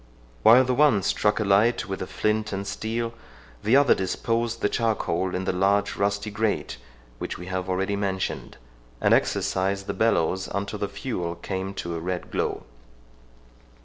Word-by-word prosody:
While 120 - +8
the 130 0 0
one 130 -7 +4
struck 105 +4 +1
a - - +1
light 105 +4 +3
with 95 -1 -4
a 95 - -3
flint 105 0 -1
and 100 0 -3
steel, 115 +3 -3 0.5
the 110 +4 +3
other 140 -1 +6
disposed 115 +5 -1
the - - +5
charcoal 95 -6 0
in 95 +1 -2
the 95 - 0
large 100 +2 +2
rusty 100 +1 -1
grate 110 - -1 0.4
which - - -4
we 90 - -8
have 95 0 -3
already 95 +2 0
mentioned, 95 -2 -3 0.4
and - - +3
exercised 95 +1 +1
the - - -3
bellows 95 -4 +1
until 100 +1 -3
the 100 - -1
fuel 100 -5 -4
came 95 +2 -4
to 85 -2 -4
a 85 - -3
red 90 +2 -4
glow. - - -2
100 Hz, 165 wpm, -25 LUFS, 95-110 Hz, 0.5 s, While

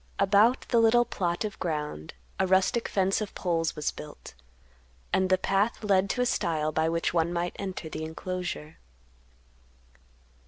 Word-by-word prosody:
About 205 +6 +4
the 235 - +4
little 235 +1 +5
plot 175 -1 -2
of 210 - -6
ground 150 - -4 0.2
a 190 - +2
rustic 190 +5 +2
fence 195 +1 +1
of 210 - -5
poles 165 -3 -1
was 150 - -1
built, 150 - -11 0.8
and 190 0 +2
the 185 - +4
path 200 +5 0
led 195 -2 +2
to 250 - 0
a - - +3
stile 155 -9 0
by 160 +1 +1
which 165 0 -1
one 170 0 +1
might 175 0 -2
enter 190 -4 -5
the 155 0 -5
enclosure. 165 -1 -5
185 Hz, 155 wpm, -28 LUFS, 160-200 Hz, 0.8 s, little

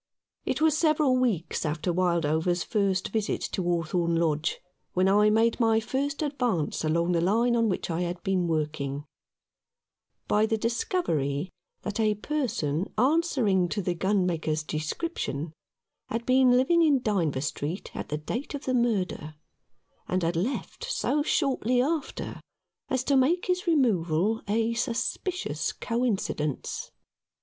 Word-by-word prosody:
It - - -1
was 315 -1 +4
several 305 -4 +3
weeks 210 -10 0
after 155 +3 -1
Wildover's 170 -1 +1
first 195 -3 0
visit 215 0 -1
to 190 - -2
Hawthorn 170 0 0
Lodge 160 -1 0 0.3
when 185 +1 +3
I 210 +2 +5
made 225 +3 +2
my 225 -2 +4
first 280 +6 -2
advance 245 - -1
along 170 +3 +1
the 170 -1 +2
line 230 +7 +2
on 230 -1 +2
which 185 - -2
I 165 +2 -1
had 175 0 -3
been 185 -2 +1
working, 150 -3 -2 1.2
by 215 +1 +3
the 220 - +1
discovery 190 - -1 0.3
that 210 +1 -4
a 215 -1 +2
person 205 - -2
answering 250 - +2
to 205 - -1
the 180 - 0
gunmaker's 175 -5 0
description 155 - -3 0.6
had 230 +1 -3
been 255 0 +5
living 260 +8 +4
in 285 -6 +3
Dynevor 165 -11 0
Street 155 +4 -4
at - - -5
the 150 - -1
date 240 - -4
of 285 - -7
the 255 - 0
murder, 195 -10 0 0.7
and 185 0 0
had 165 +1 0
left 225 - -3
so 390 -10 0
shortly 265 -5 +1
after 295 +3 -2 0.5
as 260 -1 0
to 280 +1 +2
make 300 +7 +3
his 365 -1 -1
removal 215 - +2
a 225 +2 +1
suspicious 240 +10 -2
coincidence. 215 - -2
210 Hz, 140 wpm, -27 LUFS, 170-255 Hz, 1.2 s, I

